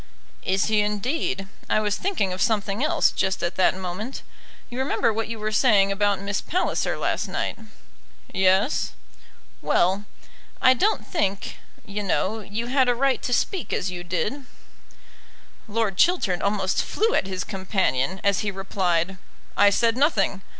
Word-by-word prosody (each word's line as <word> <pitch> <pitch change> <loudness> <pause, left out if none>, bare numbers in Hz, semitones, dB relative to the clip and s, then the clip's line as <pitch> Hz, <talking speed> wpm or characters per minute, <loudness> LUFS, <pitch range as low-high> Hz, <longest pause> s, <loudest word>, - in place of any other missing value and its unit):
"Is 190 0 +1
he, 215 -1 +2
indeed? 210 -1 -1 0.2
I - - +3
was 210 -1 0
thinking 315 - -1
of 185 - -5
something 210 +1 +1
else 315 0 +3
just 190 0 -1
at 175 - 0
that 185 0 +3
moment. 190 +7 -5 0.4
You 245 0 -6
remember 255 -3 +1
what 225 +1 -2
you 230 0 -5
were 215 0 -3
saying 210 -4 +4
about 200 -1 +1
Miss 200 +1 -2
Palliser 365 +3 -1
last - - -1
night." - - -3 0.7
"Yes." 190 +6 +2 0.7
"Well; 190 +4 +2 0.5
I 255 - +6
don't 405 - +1
think, 200 - -2 0.3
you 205 0 -4
know, 205 +2 0
you 215 +3 -4
had 260 0 +2
a 245 - +3
right 270 +2 +1
to - - -3
speak 365 - 0
as 185 - -1
you 175 -1 -6
did." 185 - -2 1.2
Lord 215 -3 -1
Chiltern 335 - +2
almost 200 -2 0
flew 450 +2 0
at - - +1
his 185 -1 -3
companion, 190 - -1
as 200 -2 +2
he 210 - -1
replied, 190 -2 -1 0.4
"I 205 - +6
said 230 +3 +2
nothing. 220 - +2
205 Hz, 155 wpm, -24 LUFS, 190-240 Hz, 1.2 s, I